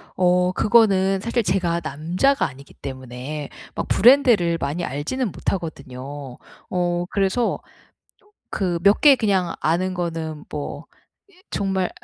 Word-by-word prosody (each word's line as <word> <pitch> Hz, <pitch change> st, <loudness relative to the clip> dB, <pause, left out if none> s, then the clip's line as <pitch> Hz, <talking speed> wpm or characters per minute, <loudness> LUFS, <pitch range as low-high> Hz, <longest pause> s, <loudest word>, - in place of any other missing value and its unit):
어 180 Hz, 0 st, +3 dB
그거는 195 Hz, -3 st, +3 dB
사실 230 Hz, +2 st, 0 dB
제가 175 Hz, -2 st, 0 dB
남자가 170 Hz, -, +1 dB
아니기 140 Hz, 0 st, -14 dB
때문에 130 Hz, +2 st, -7 dB, 0.3 s
막 -, -, -3 dB
브랜드를 230 Hz, -8 st, +5 dB
많이 150 Hz, +6 st, -2 dB
알지는 195 Hz, -, -3 dB
못하거든요. 140 Hz, -7 st, -5 dB, 0.3 s
어 175 Hz, -1 st, 0 dB
그래서 200 Hz, +4 st, 0 dB, 0.6 s
조 415 Hz, -, -29 dB, 0.2 s
그 180 Hz, -4 st, -1 dB
몇 200 Hz, +3 st, +4 dB
개 290 Hz, -3 st, +8 dB
그냥 190 Hz, -6 st, +1 dB
아는 180 Hz, +4 st, +1 dB
거는 165 Hz, -4 st, -4 dB
뭐 150 Hz, -1 st, -6 dB, 0.4 s
이 -, -, -25 dB, 0.2 s
정말 190 Hz, -2 st, -1 dB
180 Hz, 250 characters per minute, -22 LUFS, 150-195 Hz, 0.6 s, 개